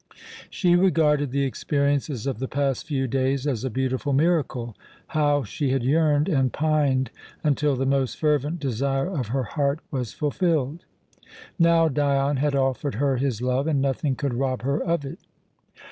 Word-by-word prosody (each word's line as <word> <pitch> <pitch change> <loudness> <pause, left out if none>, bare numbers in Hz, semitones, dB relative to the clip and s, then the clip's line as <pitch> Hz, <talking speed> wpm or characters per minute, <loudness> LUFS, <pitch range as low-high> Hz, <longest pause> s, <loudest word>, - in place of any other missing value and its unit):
She 175 -3 +2
regarded 155 -6 +3
the 140 +2 0
experiences 140 -1 -1
of 135 -5 -2
the 130 - -2
past 140 -1 -1
few 135 -4 -1
days 135 +2 0
as 130 -6 -1
a 130 - -1
beautiful 130 +3 -1
miracle. 135 -7 0 0.3
How 145 -2 +2
she 135 +6 -2
had 130 -1 0
yearned 150 +2 +2
and 135 -8 +1
pined 145 -4 +1 0.3
until 150 -1 +2
the 130 +1 -1
most 135 -1 0
fervent 150 +2 0
desire 135 +1 -1
of 130 -6 -2
her 130 +4 -1
heart 140 +5 -1
was 125 -6 -3
fulfilled! 155 -1 -1 0.7
Now 165 -1 +5
Dion 140 -1 +1
had 145 +1 0
offered 135 0 0
her 135 +2 +1
his 125 -3 -1
love, 130 +3 0
and 150 -3 +1
nothing 135 +1 0
could 140 -1 -2
rob 130 0 -1
her 140 +5 0
of 170 -4 -1
it. 160 +8 -7
140 Hz, 160 wpm, -24 LUFS, 130-150 Hz, 0.7 s, Now